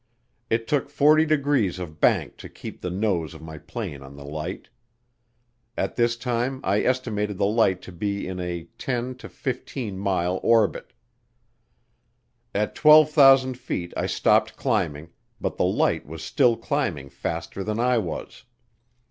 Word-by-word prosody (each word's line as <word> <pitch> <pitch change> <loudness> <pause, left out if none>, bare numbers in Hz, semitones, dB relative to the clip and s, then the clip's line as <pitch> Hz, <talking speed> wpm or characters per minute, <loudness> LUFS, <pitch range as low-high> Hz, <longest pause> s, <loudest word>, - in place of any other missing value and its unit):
It 115 0 0
took 140 0 0
40 155 +2 +4
degrees 140 - +1
of 85 -4 -8
bank - - +2
to - - -10
keep - - -10
the 90 - -3
nose 90 -4 -1
of 80 - -11
my 80 -1 -8
plane 70 -1 -6
on 70 0 -12
the 70 0 -11
light. 75 +5 -5 1.1
At - - -2
this 120 -1 +2
time 125 +2 -1
I 100 +2 +2
estimated 105 -6 -1
the 100 - +2
light 100 -3 +2
to - - -9
be 100 +3 -3
in 90 0 -5
a 90 -1 -4 0.2
10 125 0 -2
to - - -10
15 125 -5 -5
mile 95 -2 0
orbit. 115 -3 +2 1.6
At 105 +1 0
12,000 140 -4 +6
feet 90 -8 -4
I - - -1
stopped - - +2
climbing, 75 +3 -1 0.3
but - - -3
the - - +2
light - - +1
was 80 +1 -8
still 120 - +3
climbing 115 - -2
faster 95 - -4
than 110 +2 -2
I 125 0 +3
was. 95 +4 -6
105 Hz, 150 wpm, -24 LUFS, 90-130 Hz, 1.6 s, 12,000